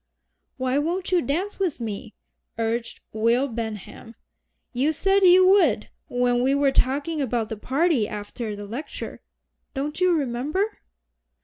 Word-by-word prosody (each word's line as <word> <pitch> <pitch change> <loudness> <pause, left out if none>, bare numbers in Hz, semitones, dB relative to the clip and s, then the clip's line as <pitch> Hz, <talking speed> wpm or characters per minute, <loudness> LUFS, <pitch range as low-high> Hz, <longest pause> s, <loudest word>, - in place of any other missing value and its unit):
"Why 260 +1 +1
won't 355 +5 -2
you 360 -2 +4
dance 355 +9 -2
with 365 -9 -1
me?" 220 -1 -6 0.4
urged 230 +1 -2
Will 230 +5 +2
Benham; 225 -1 -6 0.6
"you 275 +6 +1
said 390 +5 +2
you 370 0 +7
would 325 - +4 0.2
when 245 0 +1
we 265 +2 +3
were 280 -1 +3
talking 290 +5 +1
about 240 -4 -1
the 220 - -3
party 265 - +1
after 210 +1 -5
the 205 0 -7
Lecture 235 +9 -7 0.5
don't 295 +5 -3
you 365 0 +5
remember?" 300 - -1
265 Hz, 135 wpm, -24 LUFS, 230-330 Hz, 0.6 s, you